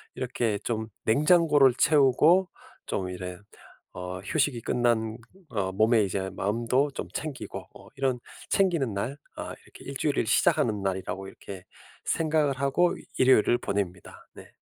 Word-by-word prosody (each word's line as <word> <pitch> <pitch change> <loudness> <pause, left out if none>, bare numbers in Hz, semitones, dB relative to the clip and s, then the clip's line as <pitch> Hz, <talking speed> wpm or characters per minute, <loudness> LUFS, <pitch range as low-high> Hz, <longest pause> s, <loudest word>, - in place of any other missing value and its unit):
이렇게 120 -4 -1
좀 110 -2 -2 0.2
냉장고를 150 +1 +5
채우고 155 +5 +4 0.4
좀 95 -1 -2
이래 90 0 -6 0.6
어 90 0 -6
휴식이 135 - 0
끝난 115 -2 0 0.3
어 100 -6 -2
몸에 110 +3 +3
이제 95 0 -2
마음도 120 +8 0
좀 - - -6
챙기고. 150 -3 -5
어 - - -15
이런 135 -2 0 0.3
'챙기는 170 - +2
날.' 115 +8 -3 0.2
아 - - -5
이렇게 - - -15
'1 - - -6
주일을 - - 0
시작하는 105 -4 +2
날.'이라고 95 0 -3
이렇게 95 -1 -10 0.4
생각을 155 -3 +1
하고 155 +6 +2 0.2
일요일을 130 -2 +5
보냅니다. 95 -5 -4
네. - - -14
120 Hz, 290 characters per minute, -27 LUFS, 100-140 Hz, 0.6 s, 냉장고를